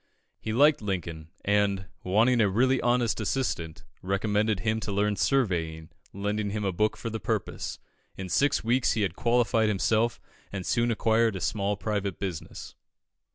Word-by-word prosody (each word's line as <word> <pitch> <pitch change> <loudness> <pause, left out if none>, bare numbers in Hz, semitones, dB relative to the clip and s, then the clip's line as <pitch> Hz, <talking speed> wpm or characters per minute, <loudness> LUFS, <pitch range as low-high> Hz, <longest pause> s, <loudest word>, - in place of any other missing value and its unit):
He 110 - -4
liked 145 +5 +4
Lincoln, 85 -6 -4 0.2
and, 100 -2 +1 0.2
wanting 115 +6 +3
a 105 - +3
really 130 +6 +2
honest 120 -2 +1
assistant, 95 -9 -2 0.2
recommended 105 +1 0
him 110 +1 0
to 110 - -4
learn 105 +1 +1
surveying, 85 - 0 0.2
lending 105 +1 -2
him 105 0 -3
a 95 - +1
book 105 +4 0
for 115 - -5
the 110 - -3
purpose. 90 - -3 0.4
In 95 - -5
six 140 +10 +2
weeks 120 +1 +2
he 110 -1 0
had 95 -3 -1
qualified 115 -2 +2
himself, 110 +3 +1 0.3
and 95 -3 -5
soon 120 0 +1
acquired 115 -1 +2
a - - -3
small 100 +2 -1
private 100 -3 -2
business. 95 -5 -6
105 Hz, 155 wpm, -27 LUFS, 95-115 Hz, 0.4 s, liked